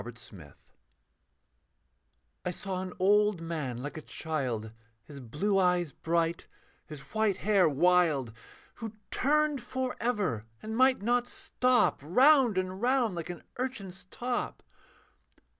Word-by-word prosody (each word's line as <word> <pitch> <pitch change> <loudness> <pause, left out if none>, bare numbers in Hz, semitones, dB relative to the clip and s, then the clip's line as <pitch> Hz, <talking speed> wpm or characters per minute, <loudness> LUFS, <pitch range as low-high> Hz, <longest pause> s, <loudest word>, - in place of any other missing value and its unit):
BEHIND 105 - -11 1.9
I - - -2
saw 185 +1 -4
an 185 -1 -5
old 210 0 +3
man 150 -7 -4
like 145 +2 -6
a - - -6
child, 130 -10 -3 0.3
His 140 +4 -11
blue 160 - 0
eyes 180 -4 +2
bright, 165 +2 -1 0.4
his 150 -3 -9
white 220 -3 +1
hair 195 -5 +3
wild, 155 -5 +2 0.4
Who 225 -2 -6 0.2
turned 300 0 +1
for 255 +1 -3
ever, 185 - -1 0.2
and 220 +1 -4
might 255 -3 +4
not 245 +2 +1
stop, 250 0 +2
Round 250 - +5
and 185 +1 -2
round 245 -3 +2
like 170 0 -5
an 175 -2 -7 0.2
urchin's 200 -9 -5
top. 245 0 -3
185 Hz, 125 wpm, -30 LUFS, 155-240 Hz, 1.9 s, Round